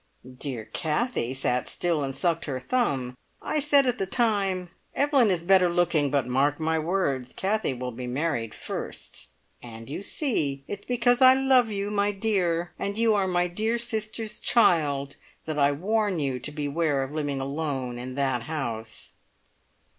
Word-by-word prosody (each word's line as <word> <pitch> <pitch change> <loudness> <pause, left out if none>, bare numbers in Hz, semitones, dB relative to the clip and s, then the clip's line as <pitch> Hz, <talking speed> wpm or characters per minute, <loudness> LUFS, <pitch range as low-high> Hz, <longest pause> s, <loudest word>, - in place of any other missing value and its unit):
Dear 125 -4 -3
Kathie 160 - -1
sat 125 -2 -1
still 170 -4 0
and 135 -1 -3
sucked 165 +3 0
her 135 -3 -3
thumb. 130 - -1 0.2
I 305 - -1
said 285 -1 +4
at 250 -2 0
the 195 - -1
time, 195 -6 0 0.3
`Evelyn 280 -5 +4
is 175 -3 0
better 185 0 +5
looking, 170 -4 +2
but 140 -2 +1
mark 135 +4 +1
my 160 0 +1
words, 155 -7 -1
Kathie 195 -7 0
will 125 0 -4
be 125 +1 -6
married 125 -4 -2
first!' - - -6 0.3
And 115 +1 -10
you 155 - -4
see! 150 - -1
It's 205 0 -6
because 245 +1 +2
I 260 0 +9
love 265 -3 +4
you, 200 0 -2
my 205 0 +2
dear, 180 -5 0
and 200 +1 -3
you 225 -1 +3
are 200 -2 +1
my 175 -1 +1
dear 215 +7 -1
sister's 220 -1 -4
child 145 - +2 0.3
that 155 -2 -3
I 140 0 +4
warn 205 +5 0
you 135 -4 -1
to 150 - -5
beware 145 -1 0
of 135 - -6
living 145 -3 -2
alone 135 -3 -3
in 130 +1 -6
that 135 -3 0
house!" 115 -5 -5
165 Hz, 165 wpm, -26 LUFS, 135-210 Hz, 0.3 s, I